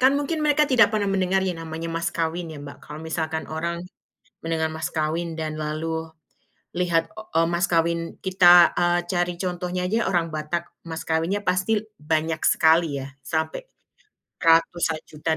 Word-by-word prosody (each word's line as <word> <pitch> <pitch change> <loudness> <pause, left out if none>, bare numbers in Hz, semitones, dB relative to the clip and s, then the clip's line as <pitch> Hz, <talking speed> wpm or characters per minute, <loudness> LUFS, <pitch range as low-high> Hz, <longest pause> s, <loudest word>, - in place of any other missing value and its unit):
kan 260 +2 +6
mungkin 300 +3 -2
mereka 300 0 +4
tidak 230 -4 +6
pernah 210 -2 0
mendengar 190 0 +1
yang 180 -3 -2
namanya 160 +1 -5
mas 165 +1 -2
kawin 165 +1 -2
ya, 150 - -8
Mbak. 140 0 -9
Kalau 150 +1 -9
misalkan 160 -1 -2
orang 170 +2 -3 0.7
mendengar 160 -1 0
mas 160 0 -3
kawin 160 +2 -1
dan 155 -1 -2
lalu 155 +2 -3 0.9
lihat, 175 -2 +1
eee, 165 -7 0
mas 175 +2 +2
kawin 170 0 +2 0.3
kita, 180 -2 +7
eee, 175 0 +3
cari 175 -1 0
contohnya 180 0 -3
aja 215 +5 0
orang 175 -3 +2
Batak, 155 +2 -2 0.3
mas 160 0 -5
kawinnya 165 +6 0
pasti 185 +4 +1 0.3
banyak 160 +1 0
sekali 165 +1 +4 0.2
ya, 135 - -6
sampai 160 - -2 0.8
ratusan 165 -1 +3
juta 155 +1 -6
170 Hz, 155 wpm, -24 LUFS, 160-180 Hz, 0.9 s, kita